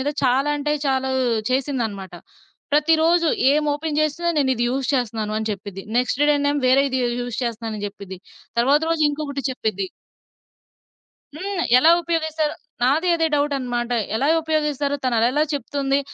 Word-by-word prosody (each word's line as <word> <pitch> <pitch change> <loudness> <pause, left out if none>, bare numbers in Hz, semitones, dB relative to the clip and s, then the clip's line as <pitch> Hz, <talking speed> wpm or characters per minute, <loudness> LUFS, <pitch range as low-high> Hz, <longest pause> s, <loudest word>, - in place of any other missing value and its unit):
మీద 270 - -1 0.2
చాలా 265 +3 +2
అంటే 295 +1 -1
చాలా 265 0 0 0.4
చేసిందన్నమాట. 240 - -2 0.6
ప్రతిరోజు 325 +3 +3 0.2
ఏమోపెన్ 300 +1 0
జేసినా 325 +3 0
నేనిది 260 -4 +1
యూజ్ 265 +1 -2
చేస్తున్నానని 220 -3 -2
చెప్పిద్ది. 195 -1 -8 0.2
నెక్స్ట్ 250 +2 -1
డేనెమో 285 0 +1
వేరే 270 +2 +5
ఇది 260 -1 -1 0.2
యూజ్ 245 -2 -4
చేస్తున్నానని 225 -3 -4
జెప్పిద్ది. 195 -2 -9 0.4
తర్వాత 275 +5 +4
రోజు 330 -1 +1
ఇంకొకటి 285 -2 -4
చెప్పిద్ది. 215 -6 -2 1.5
హ్మ్. 375 +2 -3 0.2
ఎలా 315 +6 +6
ఉపయోగిస్తారు? 315 -2 -1 0.3
నాది 305 +8 +2
అదే 325 -1 +1
డౌటన్నమాట. 255 -4 -1 0.2
ఎలా 270 +6 +1
ఉపయోగిస్తారు? 300 -3 -1
తనలాల 245 +4 +2
చెప్తుంది? 280 -1 -1
275 Hz, 125 wpm, -22 LUFS, 240-300 Hz, 1.5 s, ఎలా